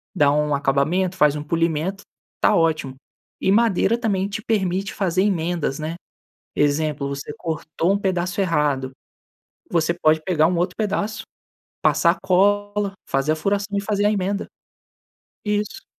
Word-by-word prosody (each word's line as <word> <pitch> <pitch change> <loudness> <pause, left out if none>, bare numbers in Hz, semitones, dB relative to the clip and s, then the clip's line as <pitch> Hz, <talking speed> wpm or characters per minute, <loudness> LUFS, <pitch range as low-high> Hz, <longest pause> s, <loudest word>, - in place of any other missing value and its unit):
dá 145 -1 +4
um 150 0 +1
acabamento, 150 +7 +1
faz 150 -4 +4
um 150 - -4
polimento, 165 +4 -1 0.4
tá - - +4
ótimo! 155 -5 +1 0.5
E 190 - +2
madeira 225 0 +3
também 200 -5 0
te 215 +2 -4
permite 195 -3 -1
fazer 185 -2 0
emendas, 170 -7 -1
né. 155 +2 -4 0.6
Exemplo, 145 -1 0
você 140 +1 -5
cortou 165 +2 -1
um 200 - +1
pedaço 185 -1 -1
errado, 150 -7 +1 0.8
você 165 -1 +2
pode 155 -2 +2
pegar 155 -3 +2
um 175 +2 +1
outro 180 +1 -1
pedaço, 210 0 -2 0.6
passar 170 +1 +3
cola, 205 +2 +2 0.2
fazer 135 +3 +1
a - - -1
furação 200 +4 -1
e - - +1
fazer 205 0 0
a 210 - +3
emenda. 200 0 -1 1.0
Isso. 210 - -2
180 Hz, 145 wpm, -22 LUFS, 155-200 Hz, 1.0 s, dá